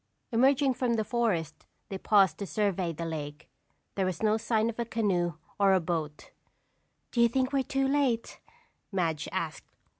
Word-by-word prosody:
Emerging 265 +3 +4
from 245 -1 0
the 220 - +1
forest 205 -10 -1 0.2
they 195 - -4
paused 195 -7 +4
to 200 - -4
survey 190 -1 0
the 165 +1 -5
lake. 150 -2 -6 0.5
There 190 -2 0
was 185 +2 -4
no 215 0 +4
sign 220 0 +1
of 230 0 -4
a - - +2
canoe 190 -7 0 0.2
or 195 -1 +5
a 190 - +4
boat. 160 -3 -4 0.8
"Do 235 - +1
you 235 - +6
think 260 +3 0
we're 275 - +3
too 270 +1 0
late?" 270 -5 0 0.5
Madge 165 -6 -1
asked. - - -5
205 Hz, 170 wpm, -29 LUFS, 170-235 Hz, 0.8 s, you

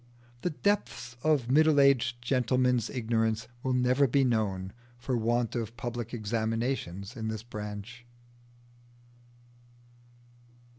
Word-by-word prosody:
The - - 0
depths 185 - -1
of 145 -6 +2
middle 155 +1 +5
aged 120 -3 +3
gentlemen's 125 -1 +2
ignorance 115 -2 0
will 130 0 0
never 125 +2 +3
be 135 +3 +3
known, 100 -6 0 0.2
for 125 +1 -2
want 120 0 0
of 115 0 -4
public 120 -1 -4
examinations 110 -2 -2
in 110 -3 -4
this 110 -1 -4
branch. 105 +1 -7
120 Hz, 105 wpm, -29 LUFS, 110-130 Hz, 0.2 s, middle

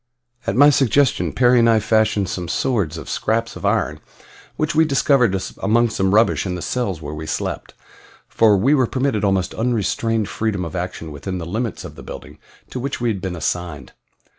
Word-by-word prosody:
At - - 0
my 145 +4 +7
suggestion 135 0 +2
Perry 125 -1 +4
and 115 0 +4
I 110 -1 +4
fashioned 110 -2 +1
some 90 -1 -4
swords 95 - -1
of 75 -4 -8
scraps 115 - -1
of - - -3
iron - - 0 0.6
which 155 0 -1
we 160 +1 +4
discovered 135 -8 +2 0.2
among 115 +3 +2
some 95 -1 +1
rubbish 115 +2 +3
in 90 -2 -3
the 90 - -5
cells 100 -10 -2
where 75 +1 -5
we 80 +1 -6
slept, - - -4 0.5
for 110 -3 +4
we 130 +10 +3
were 130 -5 +3
permitted 130 -5 -1
almost 95 -2 +1
unrestrained 115 -1 0
freedom 105 -4 -2
of 85 - -7
action 90 -3 -5
within 90 +6 -5
the 85 - -5
limits 110 +6 -3
of - - -8
the - - -12
building - - -10 0.3
to 130 - -4
which 135 +2 -3
we 120 -1 0
had 100 -4 -3
been 95 -1 -4
assigned. 85 -5 -4
110 Hz, 190 wpm, -20 LUFS, 90-120 Hz, 0.6 s, my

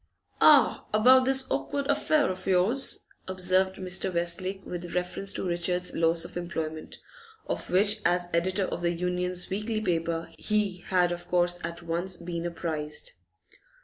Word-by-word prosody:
'Ah, - - +5
about 255 +4 +5
this 265 0 +5
awkward 135 - -2
affair 290 -2 +1
of 185 +1 -8
yours,' 195 +9 +3 0.2
observed 185 0 +2
Mr. 185 0 +1
Westlake 185 +3 0
with 175 -1 -7
reference 180 +2 -2
to - - -3
Richard's 180 +1 -1
loss 165 0 +2
of - - -8
his - - -6
employment, 160 -2 -6 0.5
of - - -4
which, 205 +4 +2
as 175 0 +1
editor 185 +4 +1
of 175 - -5
the 170 0 0
Union's 180 +1 -1
weekly 215 +3 -2
paper, 170 -4 -2
he 210 -3 0
had 180 -2 +2
of 175 0 -6
course 175 0 +1
at 170 +1 -6
once 170 +3 -2
been 170 0 -5
apprised. 155 - -4
180 Hz, 150 wpm, -27 LUFS, 170-195 Hz, 0.5 s, Ah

